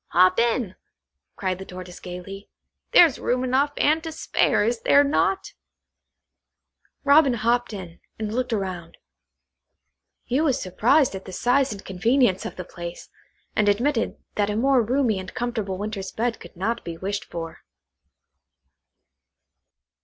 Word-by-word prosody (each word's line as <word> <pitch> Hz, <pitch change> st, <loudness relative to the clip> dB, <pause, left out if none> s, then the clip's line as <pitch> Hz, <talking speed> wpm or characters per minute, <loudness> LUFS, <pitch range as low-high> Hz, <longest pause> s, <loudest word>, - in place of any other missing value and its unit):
"Hop 185 Hz, +2 st, +5 dB
in," 235 Hz, -4 st, +1 dB, 0.6 s
cried 185 Hz, -2 st, -2 dB
the 190 Hz, -, -7 dB
Tortoise 180 Hz, -1 st, -9 dB
gaily; 190 Hz, +2 st, -8 dB, 0.4 s
"there's 330 Hz, -6 st, +6 dB
room 250 Hz, +1 st, 0 dB
enough 265 Hz, +3 st, +2 dB
and 310 Hz, +2 st, +3 dB
to 325 Hz, -, -5 dB
spare, 315 Hz, -, +1 dB
is 230 Hz, 0 st, -1 dB
there 285 Hz, -, +5 dB
not?" 305 Hz, +6 st, 0 dB, 1.5 s
Robin 280 Hz, -3 st, +5 dB
hopped 235 Hz, +2 st, +1 dB
in, 185 Hz, -5 st, -8 dB, 0.2 s
and 215 Hz, -1 st, -4 dB
looked 250 Hz, +1 st, -1 dB
round. 185 Hz, -6 st, -4 dB, 1.3 s
He 260 Hz, +5 st, 0 dB
was 275 Hz, -5 st, +2 dB
surprised 240 Hz, -, +2 dB
at 190 Hz, 0 st, -7 dB
the 190 Hz, -, -8 dB
size 255 Hz, +7 st, +2 dB
and 200 Hz, -2 st, -8 dB
convenience 205 Hz, +1 st, +1 dB
of -, -, -9 dB
the 180 Hz, -, -7 dB
place, 175 Hz, 0 st, -8 dB, 0.5 s
and 210 Hz, -1 st, +3 dB
admitted 235 Hz, +4 st, 0 dB, 0.2 s
that 205 Hz, -1 st, 0 dB
a 210 Hz, -, -1 dB
more 260 Hz, +3 st, +3 dB
roomy 235 Hz, -3 st, +1 dB
and 185 Hz, -, -7 dB
comfortable 220 Hz, -6 st, -2 dB
winter's 200 Hz, -1 st, -4 dB
bed 235 Hz, +1 st, -2 dB
could -, -, -13 dB
not 225 Hz, +6 st, -2 dB
be 165 Hz, -1 st, -6 dB
wished 200 Hz, +3 st, -3 dB
for. 165 Hz, -1 st, -7 dB
220 Hz, 140 wpm, -24 LUFS, 190-255 Hz, 1.5 s, there's